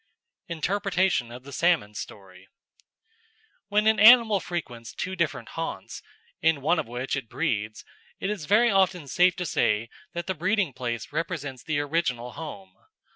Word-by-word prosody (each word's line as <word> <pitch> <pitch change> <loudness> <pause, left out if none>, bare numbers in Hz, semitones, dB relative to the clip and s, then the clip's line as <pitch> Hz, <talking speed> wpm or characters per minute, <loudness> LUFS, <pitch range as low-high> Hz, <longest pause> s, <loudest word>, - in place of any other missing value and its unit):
Interpretation 185 - 0
of 125 +1 -10
the 140 +1 -11
Salmon's 150 -10 +1
Story 95 -2 -10 1.2
When 210 +1 +2
an 220 -1 +4
animal 220 -1 +8
frequents 130 -10 -6
two 190 0 -3
different 170 -4 -2
haunts, 165 0 -5 0.4
in 160 -3 +2
one 165 +5 +2
of - - -3
which 125 +3 -3
it 130 -5 -5
breeds, 110 -7 -2 0.3
it 195 - -1
is 195 -8 -4
very 225 +7 +4
often 185 -5 +2
safe 180 +6 +3
to 180 - -3
say 110 -7 +1 0.2
that 170 0 -4
the 190 - -1
breeding 185 -1 0
place 120 0 -4
represents 145 -5 -4
the 155 -2 -1
original 140 -6 -1
home. 165 +6 -9
165 Hz, 150 wpm, -26 LUFS, 125-190 Hz, 1.2 s, animal